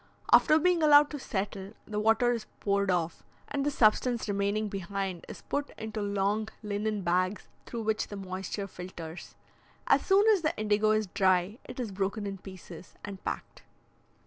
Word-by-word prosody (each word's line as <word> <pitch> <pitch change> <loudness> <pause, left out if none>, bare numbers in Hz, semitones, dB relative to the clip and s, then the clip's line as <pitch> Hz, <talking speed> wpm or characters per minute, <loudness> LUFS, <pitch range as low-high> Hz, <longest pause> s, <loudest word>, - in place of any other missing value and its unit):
After 310 - +7
being 355 +1 +3
allowed 295 -1 +7
to 295 - -5
settle, 200 -3 -4
the 210 -1 -3
water 225 +3 +3
is 230 -3 -3
poured 200 -1 +1
off, 170 -2 -1 0.2
and 280 -1 -2
the 290 - +2
substance 235 -2 +2
remaining 205 +1 0
behind 195 -2 -4
is - - -9
put 285 0 -2
into 220 -1 -5
long 205 +2 0
linen 210 0 -2
bags 185 +3 0 0.2
through 230 -2 -4
which 220 0 0
the 205 - -7
moisture 190 +1 -4
filters. 180 -3 -9 0.5
As - - +4
soon 400 +2 +4
as 415 -5 +4
the 310 - -1
indigo 215 0 +2
is 215 0 +2
dry, 185 +3 +1
it 250 - -9
is 235 -5 -3
broken 200 +2 -2
in 195 -1 -5
pieces 185 -2 -11
and 200 -2 -8
packed. - - -5
205 Hz, 170 wpm, -29 LUFS, 190-225 Hz, 0.5 s, After